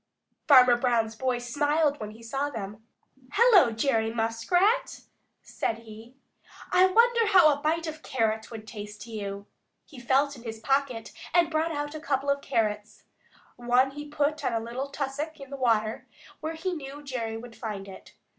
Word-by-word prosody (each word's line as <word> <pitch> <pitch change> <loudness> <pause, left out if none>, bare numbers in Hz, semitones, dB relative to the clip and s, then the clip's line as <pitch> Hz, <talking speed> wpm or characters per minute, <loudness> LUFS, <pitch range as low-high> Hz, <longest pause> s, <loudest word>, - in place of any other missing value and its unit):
Farmer 255 -4 +7
Brown's 235 -3 +1
boy 255 +1 -1
smiled 290 +4 0
when 215 - -5
he 220 +2 -13
saw 270 +5 -2
them. 215 -3 -8 0.5
"Hello, 415 - +6
Jerry 225 -1 0
Muskrat!" 350 - +1 0.4
said 225 - -3
he. 230 +2 -13 0.6
"I 370 +1 +6
wonder 465 +3 +4
how 360 -7 +6
a 285 - -6
bite 325 +2 0
of 315 -1 -6
carrot 220 -5 -1
would 220 -2 -9
taste 210 -2 -8
to 230 - -12
you." 200 -2 -5 0.4
He 285 - -13
felt 270 +4 +1
in 245 - -12
his 225 -2 -7
pocket 270 -1 -1 0.2
and 340 -2 +4
brought 320 +1 0
out 290 -1 -3
a 310 - -6
couple 280 -2 0
of 280 0 -1
carrots. 210 -3 -2 0.5
One 245 +2 +2
he 295 +1 -8
put 295 +1 -1
on - - 0
a 225 - +1
little 240 +5 -5
tussock 285 +3 -4
in 275 -1 -11
the - - -4
water 225 -4 0 0.3
where 315 +1 -4
he 360 +3 -3
knew 290 -2 -8
Jerry 230 -5 -4
would 230 0 -10
find 205 -3 -6
it. 190 - -13
260 Hz, 175 wpm, -27 LUFS, 225-295 Hz, 0.6 s, Farmer